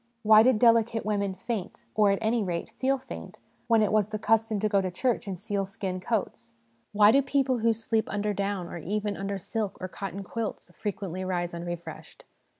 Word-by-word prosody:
Why 215 0 +8
did 250 0 +4
delicate 230 -1 +3
women 200 -2 0
faint, 195 0 -5
or, 210 -1 +4
at 195 - +2
any 225 0 +2
rate, 175 -3 -3
'feel 270 +1 +2
faint,' 260 - -9 0.3
when 225 -2 +4
it 210 - +1
was 215 -1 +2
the 215 - -3
custom 225 0 +1
to 215 - +2
go 200 -2 +2
to 185 - -2
church 230 +5 -1
in 190 -2 -3
sealskin 195 -1 -3
coats? 220 +3 -3 0.4
Why 210 0 +6
do 275 - +5
people 270 -2 +1
who 230 +1 +3
sleep 225 0 -1
under 210 0 -1
down, 200 -2 -2
or 170 - -7
even 205 +4 -2
under 195 +1 -3
silk 205 +2 -3
or 185 - -4
cotton 195 +1 -6
quilts, 215 -3 -5
frequently 185 -3 -4
rise 175 -2 -2
un 170 0 -5
refreshed 175 -1 -8
205 Hz, 195 wpm, -28 LUFS, 190-225 Hz, 0.4 s, Why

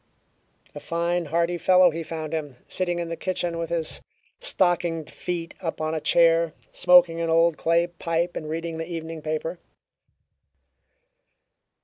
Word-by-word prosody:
A - - -7
fine 170 +1 -1
hearty 170 +3 0
fellow 180 +1 +5
he 165 +1 -4
found 160 -1 -5
him, 145 -5 -3
sitting 175 -1 -1
in 170 -1 -3
the 165 - -3
kitchen 175 -2 -2
with 165 - -3
his 165 -2 -3 0.4
stockinged 175 - 0
feet 170 -2 -4
up 165 - -4
on 155 0 -1
a 160 - -2
chair, 165 0 +4 0.2
smoking 175 -2 +5
an 165 - -1
old 165 0 +4
clay 170 +2 +2
pipe 170 0 -2
and 155 - -5
reading 165 0 -4
the 165 +2 -5
evening 165 -1 -5
paper. 155 +3 -3
165 Hz, 145 wpm, -25 LUFS, 160-175 Hz, 0.4 s, fellow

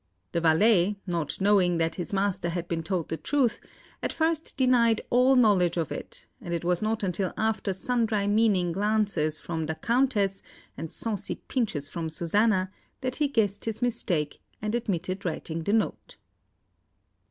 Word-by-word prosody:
The 170 - 0
valet, 185 +4 +4
not 170 -5 -2
knowing 190 -3 +3
that 165 0 0
his 175 - -5
master 195 -3 0
had 170 0 -3
been 165 -1 -2
told 170 0 -2
the 160 - -2
truth, 245 - +1 0.4
at - - -1
first 320 -1 -1
denied 240 -4 +4
all 255 +2 +5
knowledge 195 -8 +4
of 165 -4 -1
it, - - -7
and 170 0 -3
it 170 - -4
was 175 -1 +1
not 215 0 -1
until 185 -1 -1
after 220 -2 0
sundry 225 -1 0
meaning 205 -4 +2
glances 200 -5 +1
from 160 -1 -4
the 160 - -2
Countess, 225 -4 +1 0.3
and 165 - -6
saucy 220 -3 -3
pinches 195 - -2
from 160 +2 -4
Susanna, 185 +4 +1 0.3
that 255 -1 -2
he 300 - +2
guessed 210 -7 0
his 225 +1 -3
mistake, 180 -11 0 0.2
and 215 +1 -3
admitted 190 -5 -2
writing 165 -1 -3
the 200 - 0
note. 225 - -1
195 Hz, 160 wpm, -27 LUFS, 170-225 Hz, 0.4 s, all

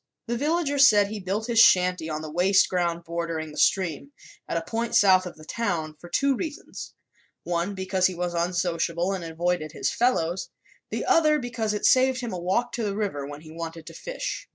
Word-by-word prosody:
The 235 - -2
villagers 285 0 +3
said 205 -3 +4
he 215 0 -5
built 200 +3 -2
his 235 -1 +1
shanty 180 -6 +5
on 155 0 -4
the 155 - -7
waste 185 +4 +4
ground 170 -2 -1
bordering 165 -2 -4
the 150 - -12
stream 155 -7 +1 0.4
at - - -1
a 165 - -2
point 230 +6 -2
south 185 -2 +5
of 175 - -10
the 155 - -13
town 170 -8 -2
for 175 - -12
two 275 +5 +2
reasons, 320 +7 -7 0.5
one, 175 +3 -2
because 190 -1 +1
he 185 - -5
was 175 0 -3
unsociable 175 +1 -1
and 185 -3 -4
avoided 165 -1 -2
his - - -1
fellows, 190 -8 0 0.4
the - - -3
other, 305 -2 +4
because 230 -5 -2
it 210 - -2
saved 260 0 +4
him 240 -5 -4
a 180 - -4
walk 195 +8 0
to 235 - -3
the 200 -1 -2
river 170 -10 -2
when 145 +1 -9
he 155 0 -13
wanted 165 0 -7
to - - -10
fish. - - -5
185 Hz, 200 wpm, -25 LUFS, 170-230 Hz, 0.5 s, shanty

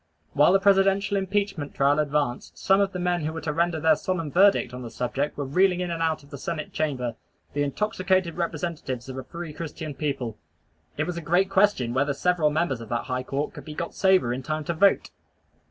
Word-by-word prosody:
While 150 +4 +5
the 195 - +5
Presidential 195 +1 +3
Impeachment 195 -5 -1
trial 140 +2 +3
advanced, 145 -4 -1
some 195 +1 +3
of 195 -1 +1
the 185 - -5
men 175 -2 0
who 155 - -1
were 160 0 -6
to 150 0 -2
render 170 0 +1
their 160 0 +4
solemn 165 -3 -3
verdict 190 -8 +4
on 125 - -6
the 120 - -6
subject 125 +5 -2
were 145 - -2
reeling 180 +6 +3
in 180 -1 -2
and 165 -1 -3
out 160 -2 0
of 140 - -19
the 140 - -7
Senate 155 0 -4
chamber, 130 -7 -2 0.4
the 145 - -1
intoxicated 185 +2 0
representatives 155 -7 -3
of 130 - -6
a - - -6
free 170 0 -7
Christian 155 -1 -6
people. 135 -7 -3 0.6
It - - +1
was 175 -1 -4
a - - -3
great 180 +4 +2
question 190 - +3
whether 140 +2 +1
several 175 -1 +2
members 150 -5 -1
of 115 - -9
that 120 - -1
high 125 0 -2
court 140 +3 -3
could - - -9
be 150 - -8
got 170 - -4
sober 190 -11 +3
in 130 - -4
time 155 +3 -3
to 170 - -2
vote. 195 +4 +3
160 Hz, 220 wpm, -25 LUFS, 140-180 Hz, 0.6 s, While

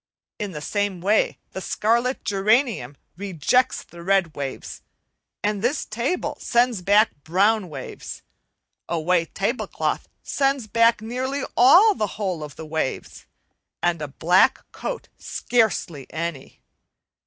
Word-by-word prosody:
In 205 -2 -3
the 150 -3 -7
same 200 +2 -1
way 205 +5 +2
the 190 - -6
scarlet 235 +7 0
geranium 205 - +1 0.2
rejects 200 - +1
the 170 - -13
red 190 -3 +1
waves; 140 -2 -6 0.6
this 215 +7 0
table 240 +11 -2
sends 240 -4 +2
back 205 +4 +4
brown 195 +4 +2
waves; 135 -4 -8 0.7
a 170 - 0
white 165 +1 0
tablecloth 215 +7 -2
sends 275 -3 0
back 230 0 +3
nearly 260 +5 -2
the 270 - +5
whole 185 -6 -2
of 150 -2 -9
the 160 - -8
waves, 155 -3 -4 0.6
and 175 -2 +1
a 150 - -3
black 180 - +3
coat - - -5
scarcely 195 - 0
any. 165 -4 -5
205 Hz, 120 wpm, -23 LUFS, 170-235 Hz, 0.7 s, the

